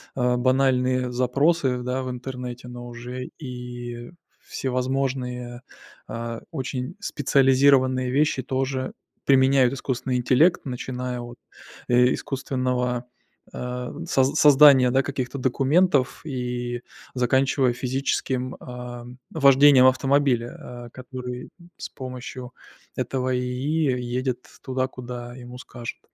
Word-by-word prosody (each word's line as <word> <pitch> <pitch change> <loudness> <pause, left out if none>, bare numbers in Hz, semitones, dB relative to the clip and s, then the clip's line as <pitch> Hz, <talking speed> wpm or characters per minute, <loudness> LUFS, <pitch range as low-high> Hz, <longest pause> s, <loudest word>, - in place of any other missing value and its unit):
а, 125 -1 +1
банальные 130 0 +2
запросы, 130 +2 +1
да, 125 +1 -2
в 130 - -4
интернете, 125 -1 -6
но 120 0 -8
уже 120 +2 -7
и 120 -3 -7 0.4
всевозможные, 125 -2 -2 0.5
а, 115 0 -5
очень 130 +3 -4
специализированные 135 -4 +3
вещи 145 0 +2
тоже 130 0 -2 0.3
применяют 130 -1 +4
искусственный 130 -1 -2
интеллект. 130 +8 +3
Начиная 125 -1 -4
от, 120 0 -9 0.5
э, 125 +1 +5
искусственного, 125 -2 -2 0.5
а, 125 0 -4 0.2
соз 135 -1 +2
создания, 140 -3 +7
да, 135 +2 +3
каких-то 130 -1 -4
документов, 135 +2 +2
и 125 -3 -3 0.3
заканчивая 130 +1 +2
физическим, 130 0 -2
а, 125 -1 -8 0.3
вождением 140 -2 +6
автомобиля, 130 -2 0
а, - - -13
который 125 -1 -7 0.3
с - - -6
помощью 125 -1 -8 0.4
этого 130 -1 -1
ИИ 130 +2 0
едет 125 +1 -3 0.2
туда, 130 -1 -1
куда 120 -1 -8
ему 125 -1 -10
скажут. 120 -2 -8
130 Hz, 105 wpm, -24 LUFS, 125-135 Hz, 0.5 s, создания